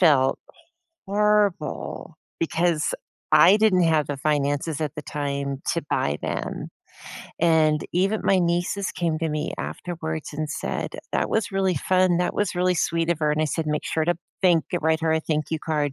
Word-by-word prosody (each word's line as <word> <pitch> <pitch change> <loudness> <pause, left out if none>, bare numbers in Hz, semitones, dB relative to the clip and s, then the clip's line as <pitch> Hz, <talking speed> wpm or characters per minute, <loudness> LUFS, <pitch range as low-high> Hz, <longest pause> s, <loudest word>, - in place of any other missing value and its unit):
felt 140 -7 +4
h - - -19 0.6
horrible, 205 -6 0 0.2
because 165 -1 +1 0.5
I 190 +4 +7
didn't 210 -5 +4
have 160 -3 +2
the 145 - -2
finances 145 +1 0
at 150 -3 -2
the 150 - -5
time 140 -1 -3
to 170 - -2
buy 70 0 0
them, - - -4 0.7
and 160 -2 +4
even 195 +5 +1
my 195 - +4
nieces 175 +3 0
came 165 -2 -1
to 165 - 0
me 150 0 -2
afterwards 160 -3 -5
and 155 +1 -3
said, - - -3 0.2
"That - - 0
was 220 -1 0
really 190 -2 +1
fun. 185 +3 +2
That 180 - 0
was 205 -3 0
really 180 0 +2
sweet 165 +1 0
of 170 - +1
her." 150 -1 +2
and 150 - 0
I - - +1
said, 160 +1 -2
"Make 150 0 -1
sure 160 - 0
to 175 - +2 0.3
thank 175 -4 +4
and 175 - -1
write 160 0 +2
her 160 -1 +1
a 160 - +2
thank 155 -1 -1
you 160 - -1
card." 150 -2 -1
160 Hz, 185 wpm, -24 LUFS, 150-180 Hz, 0.7 s, I